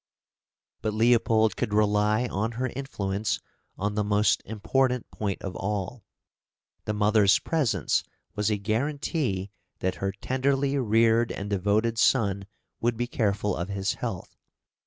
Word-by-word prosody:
But 110 -1 -2
Leopold 110 -2 +3
could 105 -4 -2
rely 105 +2 +3
on 110 0 -2
her 125 +3 -2
influence 105 -6 -2 0.4
on 105 +2 -1
the 105 0 0
most 105 0 +2
important 125 +3 0
point 100 -3 -3
of 95 -1 -5
all. 105 +3 -3 0.8
The 105 - -1
mother's 105 -1 +4
presence 120 - 0 0.3
was 105 0 0
a 105 - +1
guarantee 115 - -1 0.3
that 95 - -1
her 95 0 0
tenderly 135 +6 0
reared 115 0 +3
and 100 +1 -5
devoted 105 +4 +1
son 100 -7 +2 0.3
would 120 0 0
be 120 - 0
careful 105 -4 0
of 90 +3 -4
his 100 -1 -1
health. - - -5
105 Hz, 135 wpm, -27 LUFS, 100-120 Hz, 0.8 s, mother's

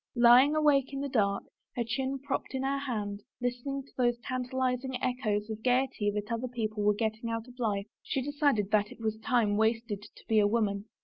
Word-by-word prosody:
Lying 245 +5 +7
awake 285 -3 +3
in 275 - -3
the 280 - -1
dark, 200 -6 +1 0.3
her 240 - 0
chin 265 +4 -2
propped 270 0 -3
in 265 - -1
her 275 +1 0
hand, 210 -7 -3 0.2
listening 250 +3 -2
to 275 - -22
those 240 -1 +2
tantalizing 255 0 -1
echoes 215 -5 -1
of 220 -1 -4
the - - -22
gayety 250 -3 +1
that 210 +1 -3
other 230 +2 -1
people 220 -3 -3
were 205 0 +3
getting 220 +1 -2
out 230 +1 -3
of 250 0 -15
life, 205 -4 0 0.2
she - - -2
decided 285 -8 +1
that 210 -1 +2
it - - -12
was 220 -1 -2
time 220 -3 +2
wasted 220 -1 0
to 210 - -15
be 220 -1 +4
a 205 - +5
woman. 205 -2 0
235 Hz, 205 wpm, -30 LUFS, 215-260 Hz, 0.3 s, Lying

